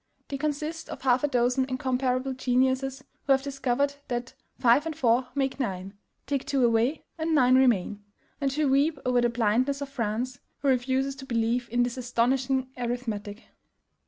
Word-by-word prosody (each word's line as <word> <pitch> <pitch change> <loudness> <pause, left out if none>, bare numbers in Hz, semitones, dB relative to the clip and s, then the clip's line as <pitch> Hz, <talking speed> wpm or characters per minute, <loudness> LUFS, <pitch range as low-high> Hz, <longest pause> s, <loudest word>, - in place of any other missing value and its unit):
They 275 - -3
consist 305 +3 -3
of - - -8
half 255 0 +3
a - - +4
dozen 250 0 +2
incomparable 255 0 -1
geniuses 260 +1 0 0.2
who 275 - +6
have 270 0 +1
discovered 275 0 0
that 240 -1 -3 0.2
FIVE 250 +6 +4
AND 320 - -4
FOUR 250 -3 +2
MAKE 270 -1 -1
NINE; 195 -5 -3 0.3
TAKE 280 -2 -1
TWO 270 -3 +2
AWAY, 235 +5 +1 0.2
AND 320 0 +1
NINE 255 -3 +5
REMAIN, 210 -6 +2 0.4
and 275 -1 +1
who 300 +2 +1
weep 280 +3 +2
over 250 -1 +3
the 240 - +3
blindness 240 +4 +1
of 280 -1 -5
France, 245 +1 -3 0.2
who 280 - +3
refuses 265 +1 +1
to 265 0 -10
believe 235 0 0
in 240 +2 +2
this 245 +1 -3
astonishing 255 +2 0
arithmetic. 230 -3 -4
255 Hz, 165 wpm, -27 LUFS, 240-275 Hz, 0.4 s, who